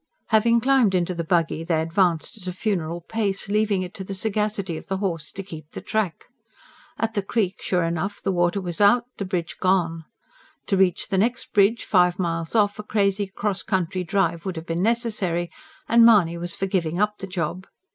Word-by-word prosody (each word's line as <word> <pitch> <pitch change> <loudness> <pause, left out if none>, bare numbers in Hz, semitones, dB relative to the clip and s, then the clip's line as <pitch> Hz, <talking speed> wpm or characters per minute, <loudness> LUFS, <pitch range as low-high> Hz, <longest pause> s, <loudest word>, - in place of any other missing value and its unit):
Having 230 +1 +4
climbed 255 -6 +3
into 180 0 0
the 170 -1 -3
buggy 165 -1 0
they 165 -1 +1
advanced 165 0 +1
at 195 -4 -12
a - - -1
funeral 175 -4 -2
pace, 205 +1 -1
leaving 205 -2 +1
it 180 +1 -8
to 195 - -6
the 195 +1 -5
sagacity 210 -2 -1
of - - -9
the 195 - -1
horse 170 -6 -3
to 195 - -6
keep 155 -5 -10
the - - -5
track. 210 -6 -2 0.7
At 225 0 -1
the 205 - 0
creek, 195 -1 -1
sure 180 -2 0
enough, 170 +4 -2
the - - -1
water 175 +1 +1
was 175 -1 -4
out, 215 +4 +5
the 200 - -2
bridge 180 -3 -3
gone. 170 -4 +1 0.6
To 195 - +1
reach 190 +1 +2
the 190 -3 +1
next 240 +4 -1
bridge, 205 +3 +3
five 180 -3 +3
miles 165 0 -2
off, 205 -1 +2
a - - -4
crazy 205 -1 0
cross 200 0 -2
country 185 -2 -1
drive 170 -1 0
would 190 -2 -4
have 160 0 -6
been 165 +1 -2
necessary; 210 -6 0 0.4
and 235 0 +6
Mahony 200 -8 +6
was 175 0 -4
for 195 - -2
giving 180 -3 -1
up 210 0 +1
the 195 - -7
job. 180 0 -3
190 Hz, 200 wpm, -24 LUFS, 175-210 Hz, 0.7 s, and